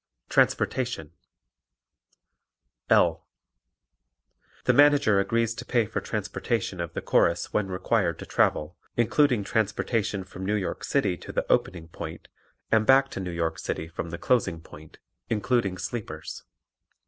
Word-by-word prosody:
Transportation 120 - +1 1.8
L. - - +3 1.4
The - - +4
Manager 145 -8 +5
agrees 115 +3 +1
to - - -7
pay 120 -3 +1
for - - -3
transportation 100 -6 -2
of 85 - -5
the - - -4
Chorus 85 0 +2
when 105 -2 +1
required 95 -1 0
to - - -8
travel, 75 +5 +1 0.2
including 120 -1 +3
transportation 105 -1 -1
from 95 0 -9
New 105 +3 0
York 100 -3 -3
City 100 -11 +1
to - - -9
the - - -1
opening 85 -3 0
point 85 - -8 0.4
and 110 -1 +3
back 135 0 +5
to - - -5
New 95 -1 -4
York 85 -1 -2
City 80 - -3
from 85 0 -6
the 85 - -5
closing 95 -9 +1
point, 80 -1 -14 0.3
including 110 -3 0
sleepers. 115 +2 -6
100 Hz, 135 wpm, -26 LUFS, 90-120 Hz, 1.8 s, Manager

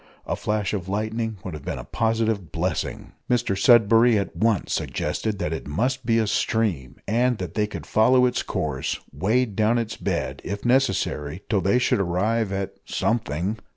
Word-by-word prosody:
A - - -1
flash 105 -2 -1
of 95 -3 -3
lightning 110 +2 -2
would 90 - -5
have 75 - -8
been - - -4
a - - -6
positive 110 -5 -1
blessing. - - -3 0.2
Mr 120 -5 +1
Sudberry 115 +2 +5
at 100 - -3
once 110 -3 +1
suggested 110 -2 -2
that 80 -5 -2
it 80 - -5
must 125 - -1
be 115 -1 +3
a 115 - +2
stream, 105 - 0
and 120 +3 +2
that - - -5
they 105 -1 +1
could 105 - -7
follow 125 +4 +4
its 125 0 +1
course - - -2
wade 105 - +1
down 110 +3 +3
its 115 -2 -3
bed, 70 -9 -2
if 100 +3 -5
necessary 100 - +1
till 100 -3 +2
they 100 +6 +3
should 125 - +2
arrive 100 +4 0
at 95 0 -3
"something!" 105 -2 -1
110 Hz, 175 wpm, -24 LUFS, 95-115 Hz, 0.2 s, Sudberry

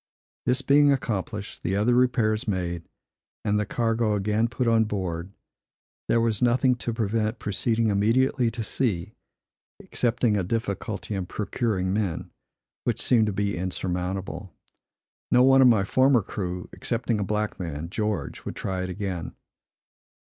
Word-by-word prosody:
This 130 +2 +2
being 145 +2 +5
accomplished, 105 -5 -3
the 95 - -1
other 105 +5 +3
repairs 120 -2 +2
made, 85 -4 -2 0.6
and 105 0 +2
the 105 - -1
cargo 115 -1 +1
again 105 +3 +1
put 125 +1 -2
on 115 -1 +4
board, 95 -4 -3 0.8
there 115 - +3
was 115 -2 0
nothing 125 +1 +4
to 120 - -3
prevent 110 0 -1
proceeding 110 +2 0
immediately 115 +5 +2
to 115 0 -5
sea, 105 -5 -1 0.7
excepting 120 -2 0
a 100 - +1
difficulty 105 +1 -3
in 95 -3 -3
procuring 100 -3 -1
men, 100 -6 -2 0.5
which - - 0
seemed 115 -3 +3
to - - 0
be 100 +1 -1
insurmountable. 95 +1 -3 0.8
No 125 - +5
one 135 0 +6
of 130 - +8
my 110 -5 +5
former 130 +3 +3
crew, 90 -2 -4
excepting 115 -2 -1
a - - 0
black 105 +2 -2
man 85 -1 -5
(George), 105 0 -2
would - - -6
try 95 -1 -3
it 90 - -3
again. 95 -2 -4
105 Hz, 145 wpm, -26 LUFS, 95-115 Hz, 0.8 s, of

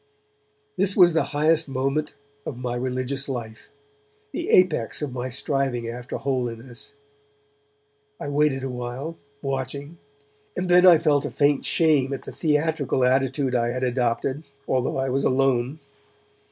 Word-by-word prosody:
This 195 +1 +2
was 175 -3 +7
the 160 -3 +2
highest 155 +1 +2
moment 135 +3 -1 0.3
of 130 - -6
my 125 -1 -3
religious 130 +2 -2
life, 115 -4 -6 0.6
the - - -4
apex 180 -8 +3
of 140 -4 -4
my 125 0 -3
striving 130 -2 -1
after 120 +1 -5
holiness. 125 -2 -4 1.3
I - - -5
waited 145 -2 +1
awhile, 125 +5 -5 0.3
watching; 140 +4 -4 0.6
and 180 +1 -1
then 180 +1 +7
I 175 -2 +9
felt 150 -3 +2
a - - -2
faint 145 -1 +1
shame 145 -5 +3
at 135 - -5
the - - -8
theatrical 150 -4 0
attitude 130 +1 +1
I 120 -1 +1
had 130 +1 -3
adopted, 125 +2 0 0.3
although 130 0 0
I 135 0 0
was 135 +2 0
alone. 130 +1 +1
135 Hz, 140 wpm, -24 LUFS, 125-150 Hz, 1.3 s, I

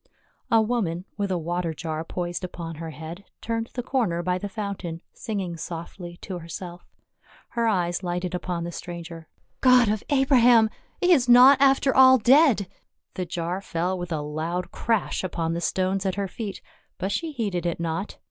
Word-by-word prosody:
A 225 -1 +5
woman, 195 -7 -1
with 200 -1 -2
a 185 - 0
water 170 0 -2
jar 160 0 -4
poised 175 +1 -4
upon 170 -3 -6
her 165 0 -6
head, 160 +4 -8 0.2
turned 230 0 -3
the 245 - -2
corner 210 -11 0
by 180 +1 0
the 205 - -5
fountain 195 -5 -5
singing 190 -6 -4
softly 175 +1 -7
to 185 -2 -5
her 165 - -11
self; 175 +1 -8 0.6
her 235 -1 0
eyes 175 -5 0
lighted 180 0 -3
upon 175 -1 -3
the 170 - -4
stranger. 170 -1 -8 0.3
"God 255 -3 +5
of 210 0 -1
Abraham! 245 -5 +5 0.3
he 360 - +3
is 255 -8 +4
not 260 +3 +8
after 270 -1 +4
all 260 0 +8
dead 250 - +5 0.2
!" - - -56
The 180 -1 -4
jar 175 +2 -3
fell 180 0 -2
with 175 -1 -6
a 155 -2 -1
loud 160 +4 -3
crash 225 -5 -1
upon 165 -2 -2
the 170 - -3
stones 185 +2 0
at 190 -2 -1
her 200 -1 -2
feet, 205 +1 -6 0.3
but 190 +2 -2
she 330 +8 -2
heeded 200 - -2
it 170 - -2
not. 170 +4 -3
185 Hz, 180 wpm, -25 LUFS, 170-225 Hz, 0.6 s, not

